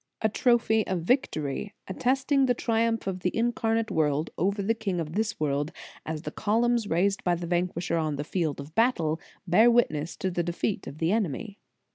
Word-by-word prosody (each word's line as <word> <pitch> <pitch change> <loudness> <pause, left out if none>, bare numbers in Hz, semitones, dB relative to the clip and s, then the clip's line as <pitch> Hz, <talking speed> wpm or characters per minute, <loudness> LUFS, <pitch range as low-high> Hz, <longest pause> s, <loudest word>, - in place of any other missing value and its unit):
A 220 - +4
trophy 220 -1 +2
of 185 -2 -1
victory, 180 - -1
attesting 265 +6 +1
the 245 - +2
triumph 230 -1 0
of 190 -1 -2
the 180 - 0
Incarnate 225 -1 0
Word 150 -1 +1
over 200 +3 0
the 225 +4 +2
king 205 -6 -2
of 160 -1 -4
this 220 +2 -1
world, 145 0 0 0.4
as 155 0 -4
the - - -4
columns 230 +1 +1
raised 195 +4 +1
by 175 -1 +2
the 170 0 -5
Vanquisher 175 0 -1
on 155 -2 0
the 145 - -3
field 155 -3 -2
of 140 +2 -9
battle 170 -8 +1 0.2
bear 195 +7 +6
witness 170 -10 +1
to 190 - -2
the 175 - 0
defeat 175 +4 -2
of 140 - -8
the 165 +2 +1
enemy. 205 - -2
190 Hz, 185 wpm, -27 LUFS, 160-225 Hz, 0.4 s, bear